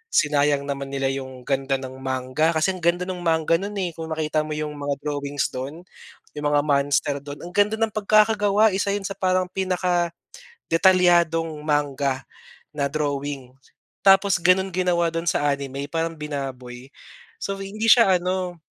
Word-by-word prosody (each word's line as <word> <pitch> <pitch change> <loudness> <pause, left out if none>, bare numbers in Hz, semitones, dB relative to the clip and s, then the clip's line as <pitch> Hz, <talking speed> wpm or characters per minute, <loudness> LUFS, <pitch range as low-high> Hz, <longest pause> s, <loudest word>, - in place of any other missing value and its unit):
sinayang 145 -1 +3
naman 140 -1 -4
nila 135 -1 0
yung 130 -2 -7
ganda 135 +1 0
ng 130 0 -8
manga 130 +4 0
kasi 160 +4 +2
ang 185 - -7
ganda 170 +1 +2
nung 180 0 -5
manga 160 0 +2
no'n, 200 +2 -5
eh, 180 -2 -1
kung 165 -1 -6
makita 155 -1 0
mo 155 - -3
yung 150 0 -3
mga 145 -1 -2
drawings 145 -1 -2
do'n, 140 +7 -6 0.5
yung 150 - -4
mga 145 0 +4
monster 145 -1 +1
do'n, 145 0 -8
ang 175 - -8
ganda 205 +1 +3
ng 225 -1 +1
pagkakagawa. 215 0 +3
Isa 200 +1 0
'yon 205 - -4
sa - - -7
parang 185 -1 +2 1.1
pinaka-detalyadong 170 - +2
manga 140 -3 0 0.5
na 140 -1 0
drawing. 140 -3 -3 0.5
Tapos 195 -1 +5
gano'n 185 +2 +3
ginawa 175 -2 +1
do'n 165 +1 -4
sa 145 -3 +1
anime, 140 -1 -4
parang 165 0 -2
binaboy. 135 -4 -6 0.6
So, 195 0 -3
hindi 210 +3 -3
siya 215 -6 +6
ano 180 -1 -3
155 Hz, 155 wpm, -23 LUFS, 140-185 Hz, 1.1 s, siya